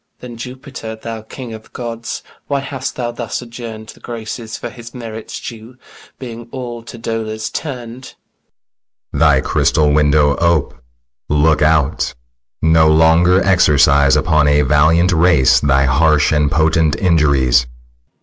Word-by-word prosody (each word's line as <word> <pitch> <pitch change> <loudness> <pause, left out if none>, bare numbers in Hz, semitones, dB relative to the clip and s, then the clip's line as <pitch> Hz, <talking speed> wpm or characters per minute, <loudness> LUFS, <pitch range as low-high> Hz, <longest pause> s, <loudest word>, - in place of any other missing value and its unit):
Then, 125 -1 -10
Jupiter, 125 -1 -8
thou 110 0 -7
king 115 +2 -9
of 110 0 -12
gods, 115 -1 -6 0.2
Why 140 -1 -1
hast 135 -1 -5
thou 120 -1 -3
thus 120 -1 -5
adjourn'd 115 -2 -9
The - - -13
graces 115 -1 -7
for 120 - -7
his 120 0 -12
merits 115 -2 -7
due, 115 +2 -10 0.4
Being 120 -2 -9
all 120 -2 -7
to 115 +1 -11
dolours 110 -1 -4
turn'd? 125 -4 -6
SICILIUS. - - -13 1.0
Thy - - +3
crystal 75 -1 +1
window 75 -1 +3
ope; 85 -4 +1 0.6
look 75 +1 +2
out; 75 -4 +1 0.5
No 80 0 +4
longer 80 +4 +4
exercise 70 -6 +4
Upon 75 0 +2
a 75 0 +3
valiant 75 +6 +3
race 80 -7 +4
thy 70 -1 +2
harsh 75 +2 +3
And 75 -2 +2
potent 80 0 +2
injuries. 70 -9 +2
90 Hz, 135 wpm, -16 LUFS, 75-115 Hz, 1.0 s, No